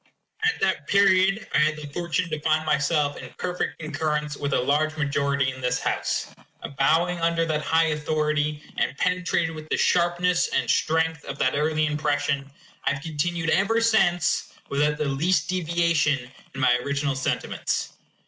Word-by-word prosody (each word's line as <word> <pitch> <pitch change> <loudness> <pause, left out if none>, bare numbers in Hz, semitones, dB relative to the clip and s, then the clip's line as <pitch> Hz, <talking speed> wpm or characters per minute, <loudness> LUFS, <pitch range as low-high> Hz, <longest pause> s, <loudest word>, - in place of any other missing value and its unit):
At 445 0 +2
that 190 -7 0
period 195 +2 +3
I - - +4
had 155 +1 +3
the 150 -1 -8
fortune 175 +1 -1
to 155 - -2
find 155 +1 +1
myself 150 -1 +1
in 130 - -9
perfect 180 0 -3
concurrence 150 -1 -2
with 140 0 -3
a - - +2
large 155 +5 +1
majority 140 -2 0
in 130 - -11
this 125 0 0
House. - - -2 0.5
Bowing 170 +5 +2
under 165 0 +1
that 155 -2 -1
high 165 +1 +2
authority, 150 0 -1
and 140 - -1
penetrated 180 -2 0
with 155 0 -9
the - - +1
sharpness 175 0 +2
and - - -1
strength 160 -1 +1
of 140 - -6
that 130 - +1
early 155 +1 +1
impression, 145 -2 -1 0.4
I 140 - +2
have 145 - -9
continued 165 +1 -1
ever 225 +4 +2
since, 195 -7 +2 0.2
without 150 +1 +1
the 150 - -1
least 150 +4 +1
deviation, 165 -7 +1 0.2
in - - -6
my 125 -2 +4
original 140 +2 -1
sentiments. 130 - -2
155 Hz, 160 wpm, -25 LUFS, 145-175 Hz, 0.5 s, I